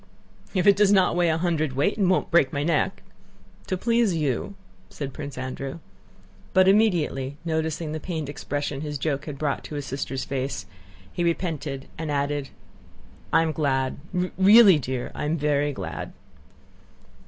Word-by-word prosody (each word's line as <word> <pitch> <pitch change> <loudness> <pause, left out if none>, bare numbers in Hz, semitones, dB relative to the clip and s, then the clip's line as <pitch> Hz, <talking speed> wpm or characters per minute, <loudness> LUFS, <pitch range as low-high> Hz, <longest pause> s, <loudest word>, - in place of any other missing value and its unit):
"If 185 -1 +2
it 200 -1 +7
does 205 0 +4
not 190 -4 +4
weigh 175 -1 +3
a 160 - +1
hundredweight 155 -1 0
and 195 -4 +2
won't 185 - +1
break 165 -6 +4
my 145 0 -1
neck... 155 -1 0 0.6
To 185 - -1
please 230 -2 +2
you..." 150 +5 -1 0.3
said 140 -3 -6
Prince 145 -3 -7
Andrew. 130 +2 -5 0.8
But 185 0 +5
immediately, 170 -10 +2
noticing 160 -1 -2
the 155 - -3
pained 160 -2 -4
expression 145 -1 -4
his 150 -1 -4
joke 140 0 -2
had 145 -3 -6
brought 145 -1 -1
to 150 - -7
his 145 -1 -4
sister's 135 0 -4
face, 135 0 -3 0.5
he 175 - -1
repented 155 -5 -2
and 160 -1 -3
added: 145 -1 -1 0.8
"I 165 +1 +5
am 160 - 0
glad; 135 -4 0 0.4
really, 200 -3 +8
dear, 130 -2 -4
I - - -4
am 155 +3 0
very 145 -1 +1
glad." 90 - -6
150 Hz, 155 wpm, -25 LUFS, 140-175 Hz, 0.8 s, really